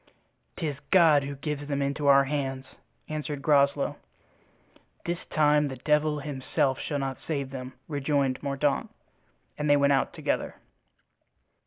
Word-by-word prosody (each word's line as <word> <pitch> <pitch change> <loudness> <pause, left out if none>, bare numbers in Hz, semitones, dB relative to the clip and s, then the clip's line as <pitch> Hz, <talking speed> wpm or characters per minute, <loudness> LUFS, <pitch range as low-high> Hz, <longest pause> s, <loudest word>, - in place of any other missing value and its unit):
"'Tis 150 -5 -3
God 160 -6 +5
who 140 0 -5
gives 145 +1 -4
them 140 -1 -1
into 140 +1 -1
our 140 0 +7
hands," 135 -2 -3 0.4
answered 150 -2 -4
Groslow. 140 -1 +3 1.1
"This 175 +1 -3
time 150 -1 +3
the 135 - -5
devil 150 +3 +1
himself 135 -1 -1
shall 145 - -3
not 135 -1 -3
save 140 -4 -3
them," 130 -1 -7
rejoined 140 -3 0
Mordaunt. 140 0 0 0.7
And 150 0 0
they 145 - +6
went 140 0 +4
out 135 - +1
together. - - -2
140 Hz, 135 wpm, -27 LUFS, 135-150 Hz, 1.1 s, our